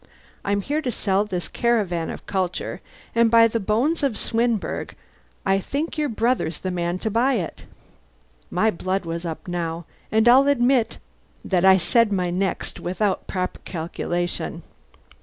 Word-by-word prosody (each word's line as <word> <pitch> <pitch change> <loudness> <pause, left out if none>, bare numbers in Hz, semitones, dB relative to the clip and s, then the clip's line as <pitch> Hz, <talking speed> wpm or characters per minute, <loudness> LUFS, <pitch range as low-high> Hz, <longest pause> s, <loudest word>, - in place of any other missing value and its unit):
I'm 200 0 0
here 295 +9 -1
to 255 -5 -2
sell 200 -2 +1
this 180 -4 -3
caravan 205 -9 0
of - - -7
culture, 185 -2 -2 0.3
and 230 0 +4
by 230 0 +7
the 230 0 -1
bones 230 - +1
of 270 -7 0
Swinburne 230 -2 -1 0.5
I 195 0 +3
think 290 - -3
your 300 -2 0
brother's 225 -8 0
the 185 - -4
man 175 0 -1
to 220 - +1
buy 245 +5 +3
it." - - -4 0.8
My 220 0 +2
blood 185 +1 -2
was 165 +1 -4
up 165 +1 -5
now, 170 -1 -3 0.3
and 220 +1 +3
I'll 265 +3 +7
admit 250 -3 +3 0.5
that 185 -1 +2
I 190 0 +8
said 230 +4 +3
my 180 -3 0
next 185 +2 -2
without 185 +2 -1
proper 185 -1 -3
calculation. 175 +1 -3
200 Hz, 155 wpm, -23 LUFS, 180-235 Hz, 0.8 s, I